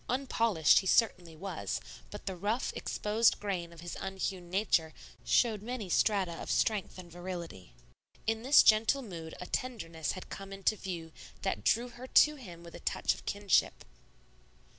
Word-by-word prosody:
Unpolished 230 - +3
he 190 - -4
certainly 180 -7 +2
was, 185 +1 -4 0.3
but 205 - -9
the 190 - -3
rough, 210 +7 -1
exposed 215 +2 +1
grain 180 -5 -3
of 170 -1 -13
his 175 0 -6
unhewn 190 -2 -4
nature 175 -5 +1 0.3
showed 220 -4 +2
many 225 -3 -5
strata 190 -5 +1
of - - -7
strength 210 -5 0
and 175 -2 -10
virility. 170 - -7 0.5
In 225 0 0
this 270 +5 +7
gentle 225 +6 +4
mood 165 -7 -8
a 180 - -6
tenderness 165 - -3
had 185 - -8
come 195 0 -7
into 195 +2 0
view 175 -5 -6 0.3
that 190 - -1
drew 240 +2 +2
her 245 +2 -10
to 300 +3 +6
him 180 - -11
with 170 - -12
a - - -9
touch - - 0
of - - -14
kinship. 200 -2 +1
195 Hz, 160 wpm, -31 LUFS, 170-225 Hz, 0.5 s, this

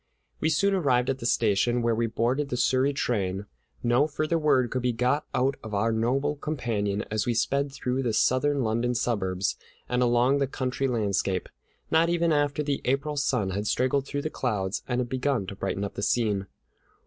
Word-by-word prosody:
We 160 - +1
soon 200 +6 +2
arrived 130 -9 +2
at 135 - -5
the 120 - -2
station, 120 +2 +2
where 115 0 +2
we 115 +1 0
boarded 125 +6 0
the 125 - -2
Surrey 130 +2 +2
train. 100 -8 -1 0.4
No 120 +5 +3
further 155 +2 -1
word 130 -6 +2
could 130 - -1
be 125 0 0
got 125 +6 0
out 135 +2 +1
of 110 -2 -5
our 110 +3 +1
noble 125 +6 0
companion 115 -9 -2
as 110 +2 -1
we 120 - +1
sped 140 +4 0
through 130 -1 -2
the 120 -3 0
southern 135 +5 +2
London 115 +2 0
suburbs 100 -5 -1 0.3
and 125 0 0
along 125 +3 +3
the 140 - +1
country 130 0 -2
landscape, 100 -6 -1 0.4
not 165 +1 +4
even 170 -1 +2
after 145 0 +1
the 140 -1 -1
April 140 +4 0
sun 105 -8 0
had 100 +3 -2
straggled 130 +5 +1
through 145 0 -3
the 155 - -3
clouds 105 -6 -2
and 125 -1 -1
begun 130 -3 -1
to 95 - -7
brighten 100 0 -3
up 100 - -4
the - - -5
scene. 105 -3 +1
125 Hz, 190 wpm, -27 LUFS, 110-140 Hz, 0.4 s, not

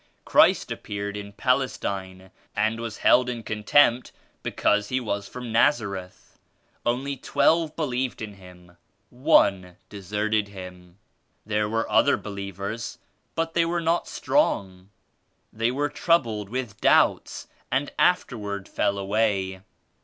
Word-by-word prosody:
Christ - - +4
appeared 100 0 -5
in 100 0 -7
Pal 125 +5 +2
estine 95 -7 -5 0.2
and 110 +2 0
was 115 -2 -5
held 125 0 +5
in 120 -2 -5
contempt 115 +4 +3 0.3
because 105 0 +1
He 130 - 0
was 100 -4 -3
from 125 -2 -7
Nazareth. 100 -7 0 0.4
Only 130 +4 -1
twelve 160 +4 +1
believed 130 -5 -2
in 110 -2 -6
Him; 90 -2 -16 0.3
one 100 - +3
deserted 105 +1 -1
Him. 90 -2 -11 0.5
There 105 0 0
were 115 +1 -1
other - - +4
believers 100 +2 -6 0.4
but 165 0 -1
they 170 - +3
were 170 +1 0
not 170 +1 0
strong. 95 - 0 0.6
They 115 +2 0
were 140 +4 0
troubled 115 - +1
with 120 -3 -5
doubts - - +2 0.2
and 140 +2 0
afterward 105 - 0
fell 100 - 0
away.. 100 -2 0
110 Hz, 125 wpm, -25 LUFS, 100-125 Hz, 0.6 s, held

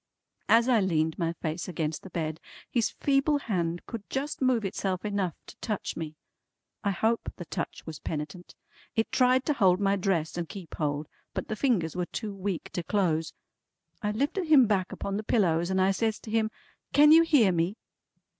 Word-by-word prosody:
As 230 +2 +6
I 245 -3 +5
leaned 160 -4 +1
my 165 -1 0
face 165 0 -4
against 160 -3 -2
the 190 - -10
bed, 160 -2 -3 0.3
his 235 -3 +2
feeble 280 +1 +2
hand 175 -10 -2
could 230 -4 -6
just 280 +2 -3
move 250 -5 +2
itself 190 0 -2
enough 200 -5 -1
to - - -12
touch 210 -4 -3
me. 155 -2 -5 0.7
I 200 - +1
hope 220 +4 0
the 175 - -8
touch - - -5
was 160 -3 -7
penitent. 155 +3 -6 0.4
It 225 -1 0
tried 255 +1 +3
to 300 - +2
hold 190 -8 +4
my 200 0 +2
dress 175 -4 0
and 170 - -4
keep 190 -5 -9
hold, 145 -1 -2 0.3
but - - -3
the 215 - -1
fingers 205 - +1
were 180 -1 -1
too 215 -3 -5
weak 195 -2 -4
to 175 - -2
close. 165 -3 0 0.7
I 210 - 0
lifted 290 - -1
him 290 -5 +7
back 195 -4 0
upon 200 0 -3
the 215 - -3
pillows 175 -6 +2
and 190 0 +1
I 190 +1 +4
says 220 +2 0
to 215 - -9
him: 220 -1 +2 0.4
"Can 295 +1 +7
you 325 +1 +9
hear 290 - +5
me?" 175 +5 0
195 Hz, 190 wpm, -28 LUFS, 170-230 Hz, 0.7 s, you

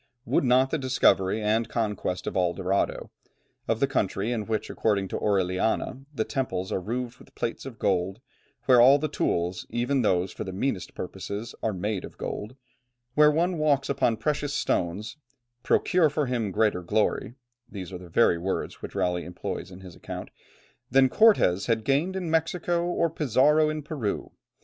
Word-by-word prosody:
Would - - +2
not 130 +1 +3
the 160 - 0
discovery 110 -6 +2
and 110 +2 +1
conquest 105 -5 -2
of - - -4
El 90 -2 +2
Dorado, 95 +1 -1 0.6
of 115 - 0
the 140 - +4
country 110 -4 -1
in 110 -4 -2
which 110 -2 -2
according 100 -3 0
to - - -4
Orellana, 100 +6 0
the 130 -7 -1
temples 125 -10 -3
are 95 - -1
roofed 120 +4 -4
with - - -18
plates 115 +3 -3
of 120 -4 -9
gold, 95 +1 0 0.5
where 125 -2 +6
all 135 +4 +8
the 155 +2 -1
tools, 90 - -1
even 125 +3 0
those 95 -4 +1
for - - -6
the 95 - -6
meanest 95 0 -3
purposes, 105 +3 -6
are 110 - 0
made 100 +1 -3
of - - -10
gold, 105 +5 -5 0.6
where 150 +1 +6
one 170 +3 +1
walks 145 -3 +2
upon 135 -5 +1
precious 145 0 -1
stones, 105 - -1 0.4
"procure 175 -4 +3
for 150 0 -1
him 120 -5 -1
greater 105 -1 +1
glory," 110 +6 0 0.3
these 95 -3 -7
are 90 - -5
the 90 -1 -12
very 85 -2 +3
words 95 +3 -3
which - - -8
Raleigh 90 -1 0
employs 90 - -5
in 90 0 -12
his 90 -3 -11
account, - - -7 0.6
"than 130 0 +5
Cortès 125 - +4
had 115 -2 +1
gained 145 +9 +1
in 180 -4 -3
Mexico, 170 +1 0
or 170 -1 +1
Pizarro 150 0 +3
in 155 -1 -4
Peru. 140 -9 -3
115 Hz, 175 wpm, -26 LUFS, 95-140 Hz, 0.6 s, all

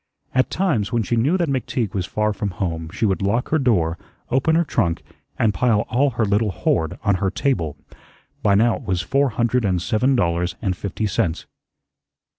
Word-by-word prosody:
At 130 0 +2
times, 145 - 0
when 120 -2 +1
she 120 - -1
knew 140 +11 +2
that 170 -2 0
McTeague 125 -5 -2
was 95 -3 -2
far 105 0 0
from 105 0 -3
home, 80 -3 -3
she 105 +3 -1
would 95 -2 0
lock 110 +5 0
her 160 - +2
door, 90 - +1 0.3
open 135 +5 +2
her 170 - +4
trunk, 90 - -1 0.3
and 110 -2 +2
pile 105 +2 +2
all 140 +4 +3
her 110 - +2
little 105 +2 +1
hoard 80 -3 -1
on 100 -3 +2
her 95 - +2
table. 90 - -1 0.6
By 100 -1 +3
now 115 +3 +3
it - - -11
was 90 -2 -1
four 140 +5 +2
hundred 120 +2 0
and 95 -3 +1
seven 120 +8 +1
dollars 85 -4 0
and 95 -5 -1
fifty 100 +3 -3
cents. 85 -5 -1
105 Hz, 195 wpm, -21 LUFS, 95-125 Hz, 0.6 s, her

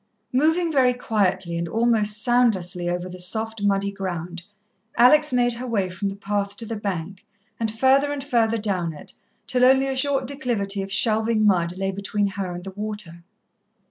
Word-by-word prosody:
Moving 320 +5 +2
very 260 -4 +3
quietly 190 -7 -1
and 170 - -3
almost 215 0 +2
soundlessly 195 -8 +1
over 175 +1 -3
the 180 0 -9
soft 220 +4 -1
muddy 200 0 +1
ground, 175 -3 -5 0.6
Alex 300 +5 +6
made 245 -1 +2
her 245 +2 -6
way 200 -6 -1
from 185 +2 -3
the 195 - -6
path 200 0 -3
to 230 - -5
the 225 - -4
bank, 195 -1 -5 0.4
and 225 -1 0
further 265 +6 +3
and 285 -2 -4
further 230 -5 +1
down 185 -6 -2
it 150 - -8 0.3
till 250 0 +1
only 265 +1 +5
a 270 -1 -2
short 270 0 +1
declivity 235 -8 -2
of 195 0 -6
shelving 220 0 +2
mud 180 -3 +2
lay 195 0 -1
between 200 +1 -1
her 195 -2 -4
and 175 0 -7
the 195 - -7
water. 205 -4 -6
210 Hz, 175 wpm, -23 LUFS, 190-245 Hz, 0.6 s, Alex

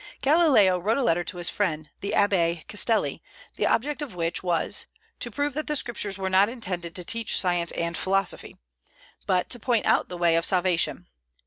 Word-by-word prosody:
Galileo 270 - +4
wrote 215 +7 0
a 275 - 0
letter 175 -4 +1
to 180 - -3
his 175 -1 +2
friend 155 -7 -2
the 200 - -4
Abbé 170 -5 +1
Castelli, 220 +2 0 0.3
the - - 0
object 290 +5 0
of 265 -11 -6
which 165 -1 -1
was 175 -3 0 0.3
"to 240 - -2
prove 285 +5 -2
that 305 +2 -4
the 300 - 0
Scriptures 225 -7 0
were 190 -1 -3
not 190 +2 +4
intended 180 -8 -5
to 180 - -3
teach 230 +3 +1
science 175 -2 0
and 170 0 -2
philosophy," 195 +1 -1 0.7
but 185 -2 +1
to 245 - -3
point 235 -1 0
out - - +2
the 180 - -6
way 170 -1 +3
of 165 - +1
salvation. 180 -2 +1
190 Hz, 190 wpm, -25 LUFS, 175-230 Hz, 0.7 s, Galileo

